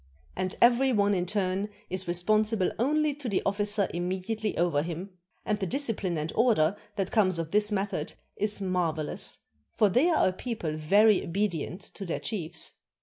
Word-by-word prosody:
And 185 0 -2
every 250 +3 +5
one 205 -3 +3
in 180 -2 0
turn 195 +1 -1 0.2
is 185 0 -4
re 175 - 0
sponsible 215 +2 +2
only 300 +4 +2
to 280 -3 -5
the 195 - 0
officer 205 0 +2
immediately 190 +5 -2
over 170 -4 +2
him; 175 +4 -5 0.3
and 210 0 0
the 190 - -2
discipline 225 - 0
and 155 +1 -3
order 210 -7 +3 0.2
that 195 -3 -2
comes 185 -5 +2
of 165 -1 -4
this 210 +1 +2
method 195 -6 -2 0.2
is 210 0 +3
marvelous, 175 -5 -1 0.4
for 210 - +4
they 255 - +3
are 325 - +3
a - - -4
people 185 -7 -4
very 200 +7 +4
obedient 180 -1 -2
to 195 - -8
their 175 - -3
chiefs. 170 -7 -4
195 Hz, 170 wpm, -28 LUFS, 175-215 Hz, 0.4 s, every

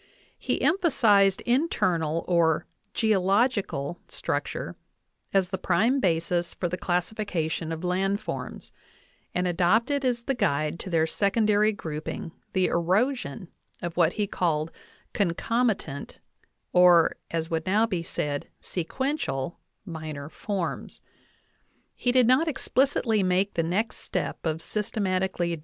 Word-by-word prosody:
k - - 0
He - - -5
emphasized 215 - +4
internal 175 - +1
or 165 -3 +3 0.3
"geological" 195 - +1
structure - - -3 0.6
as 190 -2 +2
the 190 -1 -3
prime 220 +10 +2
basis 170 -3 0
for 175 - -1
the 175 - -2
classification 175 -3 -2
of 165 +1 -5
land 190 +3 +1
forms, - - -6 0.6
and 180 0 +1
adopted 220 - +2
as 245 -2 0
the 270 - 0
guide 155 - 0
to 190 - -6
their 165 -2 +3
secondary 210 +4 +2
grouping 160 -3 -5 0.2
the 185 -1 +3
erosion 185 - 0 0.3
of 175 -1 -5
what 170 -1 +3
he 210 - 0
called 165 -5 -1 0.4
"concomitant," 205 - -1 0.6
or, 175 -2 +6
as 165 0 -3
would 165 +1 -1
now 210 +4 +4
be 185 -7 -2
said, 145 -3 -3
sequential, 175 - -3 0.3
minor 155 -5 -6
forms. 195 0 -4 0.5
\ - - -42
He 245 - +4
did 250 -1 +5
not 260 +7 +4
explicitly 260 -6 +1
make 185 +2 +1
the - - +1
next 190 +8 -1
step - - -3
cf 160 0 -2
systematically~o! 185 -5 -1
185 Hz, 125 wpm, -26 LUFS, 165-220 Hz, 0.6 s, or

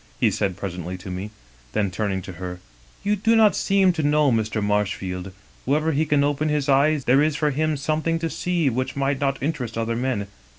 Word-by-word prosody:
he - - +3
said 95 -3 -1
presently 90 -2 -5
to 90 +1 -8
me. 95 +3 -5 0.4
Then, 100 -3 0
turning 95 -1 -2
to 95 - -7
her: 90 -1 -5 0.2
" - - -28 0.2
*You 205 +1 +2
do 225 +3 +2
not 220 -2 +5
seem 195 -2 +3
to 165 - -2
know 150 -1 +3
Mr. 110 -1 0
Marshfield. 95 -3 -1 0.3
Wherever 155 +4 +1
he 155 +1 +1
can 145 -1 +3
open 145 +2 0
his 150 -2 0
eyes 140 +1 +3
there 135 +3 +5
is 155 0 +2
for 150 0 +1
him 155 +2 0
something 155 +3 0
to 165 0 -2
see 175 -4 0
which 130 +1 -1
might 140 0 0
not 135 -1 0
interest 130 -7 -2
other 115 0 -1
men. 120 -4 -1
135 Hz, 210 wpm, -23 LUFS, 105-155 Hz, 0.4 s, not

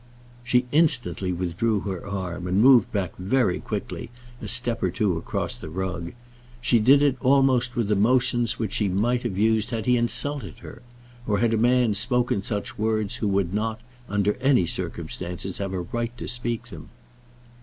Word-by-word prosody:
She 125 0 +2
instantly 120 - +2
withdrew 95 +5 -1
her 95 -4 -5
arm 90 -3 -5
and 90 +2 +1
moved 125 -2 +6
back 95 -5 -2
very 100 +1 +1
quickly - - -5 0.3
a - - -6
step 120 -1 +1
or 95 - +1
two 90 0 0
across 80 - -3
the - - -9
rug. 90 0 -4 0.5
She 120 -1 +2
did 135 +6 +5
it 140 -3 +2
almost 130 -2 +3
with 115 -3 0
the 105 - +2
motion 120 +3 +2
which 110 -4 -3
she 105 -2 +1
might 120 +6 +1
have 95 - -4
used 110 +1 +2
had 115 -3 -3
he 125 0 +3
insulted 120 - 0
her; - - -11 0.5
or 105 -2 +1
had 115 +1 +1
a - - +3
man 120 0 +3
spoken 120 0 +1
such 100 +1 -4
words 110 +1 0
who 110 - -1
would 95 -2 0
not, 110 +1 -2 0.3
under 105 0 +1
any 130 -8 +3
circumstances, 90 +2 -5
have 100 -1 -3
a 95 -2 -3
right 120 +6 -4
to - - -6
speak 120 0 -3
them. 80 -7 -11
110 Hz, 175 wpm, -24 LUFS, 95-125 Hz, 0.5 s, moved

